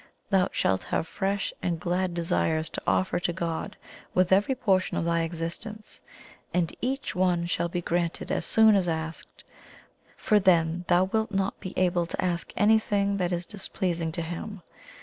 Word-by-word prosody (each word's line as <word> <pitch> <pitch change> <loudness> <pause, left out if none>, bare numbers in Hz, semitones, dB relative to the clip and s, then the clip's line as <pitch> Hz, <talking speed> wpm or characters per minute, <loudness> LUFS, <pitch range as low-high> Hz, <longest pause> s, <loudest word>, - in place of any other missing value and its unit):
Thou 190 -2 +3
shalt 95 -1 0
have 160 - -1
fresh 195 +3 -2
and 170 -2 -1
glad 180 +1 -1
desires 165 -2 0
to - - -4
offer 95 - +2
to 175 - -1
God 170 +4 -4 0.4
with 185 0 +3
every 205 +8 +4
portion 195 -7 +1
of - - -1
thy 170 0 +1
existence, 170 +7 -5 0.5
and 175 -2 0
each 265 +3 -2
one 180 -2 +1
shall 170 0 -1
be 175 0 -3
granted 170 0 -1
as - - 0
soon 220 -1 +5
as 185 -3 +2
asked, 160 0 -5 0.7
for 210 - +3
then 175 -2 +2
thou 175 +1 +4
wilt 220 +3 0
not 195 -1 -1
be 185 - -7
able 175 -2 +2
to - - -6
ask 175 -2 -1
anything 205 -2 +3
that 180 -2 0
is 175 0 -2
displeasing 175 -4 -2
to 170 - -2
Him. 175 +3 -6
180 Hz, 170 wpm, -27 LUFS, 170-195 Hz, 0.7 s, soon